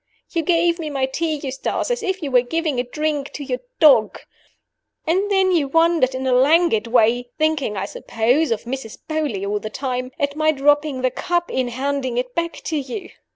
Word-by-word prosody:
You 335 Hz, -, 0 dB
gave 340 Hz, +1 st, +2 dB
me 315 Hz, -2 st, -4 dB
my 270 Hz, -2 st, 0 dB
tea, 315 Hz, +4 st, -2 dB
Eustace, 275 Hz, -, -3 dB
as 485 Hz, -2 st, -1 dB
if 380 Hz, -4 st, -2 dB
you 280 Hz, -, -3 dB
were 250 Hz, -1 st, +5 dB
giving 300 Hz, +1 st, -1 dB
a -, -, +1 dB
drink 295 Hz, +2 st, -2 dB
to 290 Hz, -, -6 dB
your 255 Hz, -2 st, -3 dB, 0.2 s
dog. 275 Hz, -9 st, +5 dB, 0.9 s
And 380 Hz, +6 st, +1 dB
then 385 Hz, -2 st, +3 dB
you 320 Hz, -6 st, +2 dB
wondered 325 Hz, -3 st, +3 dB
in 260 Hz, 0 st, -3 dB
a 260 Hz, -, +1 dB
languid 275 Hz, -2 st, +4 dB
way 240 Hz, +1 st, +2 dB
(thinking, 310 Hz, -9 st, 0 dB
I 190 Hz, -, -2 dB
suppose, 245 Hz, +10 st, 0 dB
of 230 Hz, -, -1 dB
Mrs. 240 Hz, -2 st, -6 dB
Beauly 295 Hz, -11 st, -2 dB
all 205 Hz, +1 st, -1 dB
the 215 Hz, -, -6 dB
time), 255 Hz, +1 st, -3 dB
at 285 Hz, -2 st, -1 dB
my 310 Hz, 0 st, +3 dB
dropping 290 Hz, -1 st, +2 dB
the 255 Hz, -, +2 dB
cup 345 Hz, +5 st, -1 dB
in 255 Hz, -1 st, 0 dB
handing 260 Hz, 0 st, -2 dB
it 250 Hz, 0 st, -2 dB
back 335 Hz, +2 st, -1 dB
to 315 Hz, -, -2 dB
you. 285 Hz, +8 st, -6 dB
280 Hz, 200 wpm, -21 LUFS, 250-325 Hz, 0.9 s, were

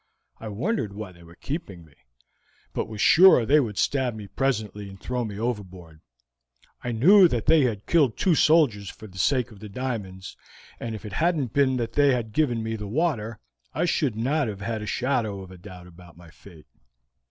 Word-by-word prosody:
"I 110 Hz, -, -8 dB
wondered 110 Hz, -, -2 dB
why 105 Hz, -3 st, -7 dB
they 85 Hz, -1 st, -18 dB
were 85 Hz, 0 st, -16 dB
keeping 100 Hz, -, -6 dB
me, 75 Hz, -, -22 dB, 0.8 s
but -, -, -2 dB
was 110 Hz, -1 st, -9 dB
sure 175 Hz, -, +6 dB
they 145 Hz, +6 st, +5 dB
would 110 Hz, -7 st, -2 dB
stab 130 Hz, -4 st, 0 dB
me 105 Hz, -2 st, -8 dB
presently 105 Hz, -4 st, -2 dB
and 95 Hz, 0 st, -13 dB
throw 125 Hz, -1 st, -3 dB
me 105 Hz, -3 st, -6 dB
overboard. 95 Hz, -8 st, -5 dB, 0.8 s
I 120 Hz, -, -2 dB
knew 180 Hz, -, +6 dB
that 120 Hz, -8 st, -2 dB
they 155 Hz, -3 st, +5 dB
had 105 Hz, -5 st, -3 dB
killed 145 Hz, -9 st, +2 dB
two 185 Hz, -, +2 dB
soldiers 145 Hz, -, +3 dB
for 110 Hz, -, -12 dB
the 95 Hz, -3 st, -11 dB
sake 125 Hz, +3 st, +1 dB
of 105 Hz, -, -14 dB
the 105 Hz, 0 st, -9 dB
diamonds, 100 Hz, -6 st, -5 dB, 0.4 s
and 115 Hz, -1 st, -5 dB
if 110 Hz, -, -10 dB
it 105 Hz, -, -8 dB
hadn't 155 Hz, -7 st, 0 dB
been 135 Hz, -2 st, +2 dB
that 115 Hz, -2 st, -3 dB
they 145 Hz, -2 st, +4 dB
had 110 Hz, -3 st, -5 dB
given 120 Hz, -6 st, 0 dB
me 110 Hz, 0 st, -3 dB
the 105 Hz, -2 st, -6 dB
water, 115 Hz, -4 st, -1 dB, 0.4 s
I -, -, +1 dB
should 145 Hz, -8 st, 0 dB
not 135 Hz, +5 st, 0 dB
have 100 Hz, -2 st, -6 dB
had 110 Hz, +1 st, -3 dB
a 105 Hz, -, -6 dB
shadow 115 Hz, -7 st, -1 dB
of 95 Hz, -1 st, -12 dB
doubt 90 Hz, -2 st, -11 dB
about 90 Hz, -1 st, -16 dB
my 85 Hz, -1 st, -15 dB
fate." 85 Hz, -4 st, -16 dB
110 Hz, 200 wpm, -25 LUFS, 100-135 Hz, 0.8 s, sure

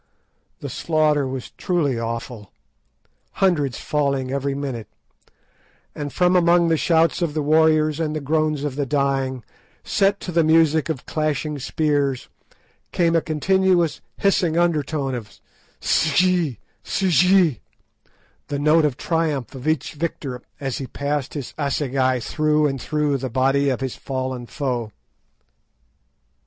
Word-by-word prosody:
The -, -, -5 dB
slaughter 155 Hz, -3 st, +1 dB
was 130 Hz, -1 st, -6 dB
truly 155 Hz, -, 0 dB
awful, 115 Hz, -2 st, -5 dB, 0.8 s
hundreds 150 Hz, -10 st, +1 dB
falling 140 Hz, -3 st, -1 dB
every 140 Hz, 0 st, -1 dB
minute; 130 Hz, -6 st, -4 dB, 1.1 s
and 145 Hz, -1 st, -5 dB
from 180 Hz, +3 st, +2 dB
among 170 Hz, -1 st, +4 dB
the 165 Hz, -, +3 dB
shouts 165 Hz, +2 st, +2 dB
of 160 Hz, -3 st, -1 dB
the 155 Hz, -, 0 dB
warriors 155 Hz, 0 st, +3 dB
and 155 Hz, -2 st, -1 dB
the -, -, -1 dB
groans 155 Hz, 0 st, 0 dB
of 145 Hz, -3 st, -3 dB
the 145 Hz, -2 st, -1 dB
dying, 135 Hz, -2 st, 0 dB, 0.4 s
set 200 Hz, +1 st, +1 dB
to 180 Hz, -, -5 dB
the 170 Hz, -1 st, +3 dB
music 160 Hz, -1 st, +3 dB
of 145 Hz, -6 st, -4 dB
clashing 150 Hz, -1 st, -2 dB
spears, 140 Hz, -2 st, -1 dB, 0.6 s
came 170 Hz, -1 st, +2 dB
a 165 Hz, -, +4 dB
continuous 175 Hz, +1 st, +1 dB, 0.2 s
hissing 180 Hz, -4 st, +2 dB
undertone 155 Hz, -5 st, 0 dB
of 115 Hz, -4 st, -7 dB, 0.4 s
"S'gee, 165 Hz, -, +2 dB, 0.3 s
s'gee," 180 Hz, -, +3 dB, 0.9 s
the 145 Hz, -, -3 dB
note 155 Hz, +2 st, +4 dB
of 140 Hz, -3 st, -1 dB
triumph 155 Hz, -8 st, -1 dB
of 130 Hz, +1 st, -7 dB
each 155 Hz, -4 st, 0 dB
victor 145 Hz, -5 st, -4 dB, 0.2 s
as 135 Hz, -3 st, -3 dB
he 135 Hz, -, -5 dB
passed 140 Hz, +2 st, -3 dB
his 140 Hz, -4 st, -5 dB
assegai 135 Hz, -3 st, 0 dB
through 150 Hz, +5 st, +1 dB
and 135 Hz, -3 st, -1 dB
through 150 Hz, -1 st, 0 dB
the 130 Hz, 0 st, -4 dB
body 135 Hz, +3 st, +2 dB
of 130 Hz, 0 st, -2 dB
his 130 Hz, -2 st, -3 dB
fallen 130 Hz, -2 st, -4 dB
foe. 125 Hz, -7 st, -3 dB
150 Hz, 135 wpm, -22 LUFS, 135-160 Hz, 1.1 s, among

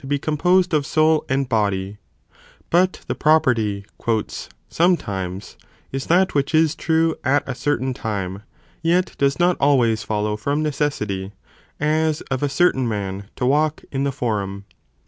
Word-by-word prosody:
be 145 Hz, +1 st, +1 dB
composed 175 Hz, +5 st, +2 dB
of 150 Hz, -2 st, +3 dB
soul 155 Hz, +3 st, +2 dB
and 135 Hz, 0 st, 0 dB
body, 100 Hz, -3 st, -1 dB, 0.7 s
but 180 Hz, +2 st, +2 dB
the -, -, -2 dB
property 120 Hz, -10 st, +2 dB, 0.8 s
"sometimes" 100 Hz, -, -1 dB, 0.3 s
is 135 Hz, 0 st, -4 dB
that 185 Hz, +3 st, +3 dB
which 140 Hz, +2 st, 0 dB
is 160 Hz, -1 st, +4 dB
true 160 Hz, 0 st, +1 dB
at 140 Hz, +2 st, +1 dB
a 135 Hz, -, -2 dB
certain 130 Hz, -1 st, -1 dB
time, 100 Hz, -5 st, -4 dB, 0.4 s
yet 175 Hz, +3 st, +1 dB
does 140 Hz, 0 st, +2 dB
not 175 Hz, 0 st, +3 dB
always 120 Hz, -6 st, +3 dB
follow 105 Hz, -1 st, -1 dB
from 140 Hz, +8 st, -1 dB
necessity, 105 Hz, -10 st, -2 dB, 0.5 s
as 155 Hz, +1 st, +1 dB
of 130 Hz, -, -1 dB
a 145 Hz, -, +1 dB
certain 135 Hz, -5 st, +2 dB
man 100 Hz, -1 st, -4 dB
to 125 Hz, -, -2 dB
walk 150 Hz, +3 st, +1 dB
in 135 Hz, 0 st, -1 dB
the 140 Hz, -, 0 dB
Forum. 100 Hz, -6 st, -3 dB
140 Hz, 145 wpm, -21 LUFS, 105-155 Hz, 0.8 s, is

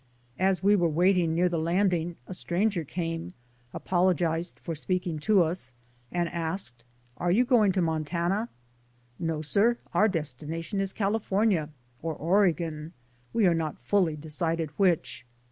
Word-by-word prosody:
As 190 Hz, 0 st, +2 dB
we 205 Hz, +1 st, +5 dB
were 175 Hz, -4 st, +2 dB
waiting 175 Hz, 0 st, +2 dB
near 180 Hz, +2 st, +3 dB
the 170 Hz, -2 st, -1 dB
landing 175 Hz, 0 st, +1 dB
a 185 Hz, -, -7 dB
stranger* 180 Hz, +1 st, 0 dB
came, 165 Hz, +2 st, -4 dB, 0.4 s
apologized 175 Hz, -2 st, 0 dB
for 170 Hz, -, -5 dB
speaking 175 Hz, 0 st, -2 dB
to 195 Hz, +3 st, +4 dB
us, 160 Hz, -7 st, -3 dB, 0.4 s
and 175 Hz, -1 st, 0 dB
asked, 165 Hz, -7 st, -3 dB, 0.3 s
"Are 175 Hz, -, -1 dB
you 225 Hz, +8 st, +4 dB
going 230 Hz, -6 st, +4 dB
to 185 Hz, -2 st, +1 dB
Montana?" 170 Hz, +7 st, -1 dB, 0.7 s
"No, 165 Hz, -2 st, -2 dB
sir, 215 Hz, +10 st, +3 dB, 0.2 s
our 215 Hz, -, +4 dB
destination 165 Hz, -, -3 dB
is 195 Hz, -1 st, -2 dB
California, 200 Hz, -5 st, +1 dB, 0.3 s
or 160 Hz, -1 st, -3 dB
Oregon; 165 Hz, -3 st, +1 dB, 0.4 s
we 225 Hz, -3 st, +2 dB
are 175 Hz, -, +5 dB
not 160 Hz, -2 st, -2 dB
fully 165 Hz, +4 st, +1 dB
decided 160 Hz, +1 st, -2 dB
which." 175 Hz, -, 0 dB
175 Hz, 140 wpm, -28 LUFS, 160-190 Hz, 0.7 s, we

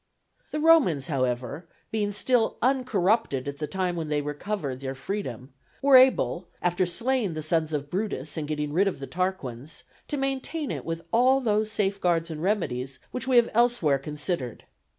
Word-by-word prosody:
The 300 Hz, -, -3 dB
Romans, 295 Hz, -, +4 dB
however, 130 Hz, +3 st, -2 dB, 0.2 s
being 210 Hz, -2 st, 0 dB
still 225 Hz, +2 st, +1 dB
uncorrupted 225 Hz, -, +1 dB
at 140 Hz, 0 st, -5 dB
the 150 Hz, -, -2 dB
time 185 Hz, 0 st, -1 dB
when 160 Hz, -2 st, -4 dB
they 150 Hz, -1 st, 0 dB
recovered 145 Hz, -2 st, -4 dB
their 135 Hz, 0 st, -4 dB
freedom, 135 Hz, -, -5 dB, 0.3 s
were 275 Hz, -1 st, +5 dB
able, 255 Hz, -8 st, +5 dB
after 175 Hz, +1 st, +1 dB
slaying 225 Hz, 0 st, 0 dB
the 155 Hz, -, -3 dB
sons 160 Hz, 0 st, +1 dB
of 145 Hz, -1 st, -3 dB
Brutus 180 Hz, -7 st, -2 dB
and 155 Hz, -2 st, -3 dB
getting 150 Hz, -1 st, -2 dB
rid 195 Hz, +5 st, +3 dB
of 195 Hz, -, -1 dB
the 135 Hz, -, -6 dB
Tarquins, 160 Hz, -7 st, -4 dB, 0.2 s
to 295 Hz, -, -3 dB
maintain 270 Hz, +3 st, -2 dB
it -, -, -5 dB
with 165 Hz, 0 st, -4 dB
all 255 Hz, +3 st, +5 dB
those 215 Hz, -3 st, +1 dB
safeguards 180 Hz, -5 st, +1 dB
and 155 Hz, -1 st, -6 dB
remedies 135 Hz, -10 st, -1 dB
which 250 Hz, 0 st, -4 dB
we 260 Hz, -, +2 dB
have 240 Hz, -1 st, +5 dB
elsewhere 230 Hz, -, +3 dB
considered. 150 Hz, -, -3 dB
175 Hz, 170 wpm, -26 LUFS, 145-225 Hz, 0.3 s, were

